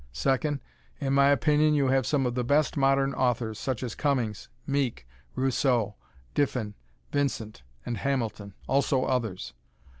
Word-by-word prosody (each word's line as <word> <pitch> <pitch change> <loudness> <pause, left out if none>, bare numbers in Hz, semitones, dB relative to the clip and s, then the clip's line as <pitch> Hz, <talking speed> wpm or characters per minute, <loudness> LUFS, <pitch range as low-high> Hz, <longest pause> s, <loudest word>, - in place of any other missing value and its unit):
Second, 135 - 0 0.4
in 135 -2 -1
my 140 0 +5
opinion 150 +1 +3
you 140 -2 +2
have 130 -1 +2
some 135 -1 +1
of 125 - 0
the 125 0 -1
best 145 +4 +2
modern 135 0 +2
authors, 120 -4 0
such 130 -2 -2
as 120 - -3
Cummings, 125 -8 -1 0.2
Meek, 135 - -1 0.3
Rousseau, 125 -5 +1 0.4
Diffin, 125 -7 0 0.4
Vincent 130 - -2 0.2
and 120 - -3
Hamilton. 110 -6 -2
Also 135 0 +2
others. 115 -8 -2
130 Hz, 140 wpm, -27 LUFS, 120-140 Hz, 0.4 s, my